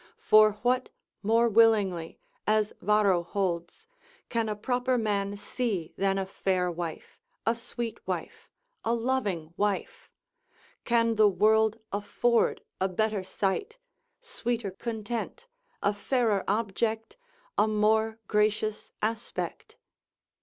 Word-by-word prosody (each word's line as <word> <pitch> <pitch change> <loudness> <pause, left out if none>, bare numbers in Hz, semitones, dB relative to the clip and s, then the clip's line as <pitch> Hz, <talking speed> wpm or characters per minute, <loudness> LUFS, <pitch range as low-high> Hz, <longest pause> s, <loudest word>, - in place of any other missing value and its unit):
For 215 0 +6
what 250 +1 +1 0.3
more 230 +3 +3
willingly 205 -7 +3 0.3
(as 215 -1 +2
Varro 200 -2 +3
holds) 175 - -3 0.4
can 230 -2 0
a 210 - -1
proper 250 +3 0
man 205 -3 -1
see 205 -7 -3
than 195 0 +1
a 195 - -1
fair 185 -2 0
wife, 170 -2 -6 0.3
a 230 - +3
sweet 235 -1 -5
wife, - - -5 0.3
a 230 +1 +1
loving 210 -10 -1
wife? 210 - -2 0.8
can 230 -1 +2
the 215 -1 +6
world 215 +3 +3 0.2
afford 225 +3 +1 0.2
a 190 - +2
better 210 +1 0
sight, 195 - -2 0.4
sweeter 240 - -3
content, 230 - -5 0.4
a 205 - +3
fairer 215 -1 +1
object, 220 +2 -1 0.4
a 210 - +3
more 220 +1 +2
gracious 215 0 0
aspect? 225 +1 -3
215 Hz, 110 wpm, -28 LUFS, 195-230 Hz, 0.8 s, For